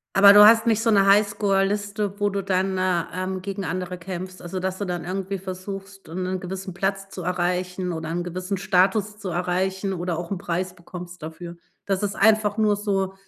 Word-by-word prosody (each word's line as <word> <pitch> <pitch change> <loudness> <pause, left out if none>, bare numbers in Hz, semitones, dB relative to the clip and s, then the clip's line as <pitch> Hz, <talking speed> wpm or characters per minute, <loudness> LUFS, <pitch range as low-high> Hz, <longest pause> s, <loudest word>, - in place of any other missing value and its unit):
Aber 200 +1 +9
du 205 0 +10
hast 225 +2 +6
nicht 225 -1 +3
so 230 - +3
'ne 200 -2 +5
Highscore-Liste, 205 0 +1
wo 205 0 +2
du 200 -1 -3
dann, 190 0 0
äh, 185 -2 +1
ähm, 185 +1 -3
gegen 195 +1 -4
andere 180 +1 -3
kämpfst. 185 +1 -7
Also, 180 +2 -5
dass 190 0 -2
du 205 - -3
dann 175 -2 -4
irgendwie 190 +2 -3
versuchst, 195 0 -8
äh, 165 - -8
'nen 185 0 -2
gewissen 190 0 -6
Platz 195 +2 -2
zu 185 - -7
erreichen 180 0 -1
oder 160 0 -5
'n 175 +1 -2
gewissen 185 +3 -4
Status 200 +3 +2
zu 200 -2 -5
erreichen 185 +2 -1
oder 175 -1 -2
auch 170 -1 -6
'n 195 - -2
Preis 180 +2 -3
bekommst 175 -1 -10
dafür. 170 +2 -7 0.3
Das 195 0 -1
ist 205 0 -1
einfach 215 0 +3
nur 215 -1 +3
so 195 -2 -1
190 Hz, 200 wpm, -24 LUFS, 180-200 Hz, 0.3 s, du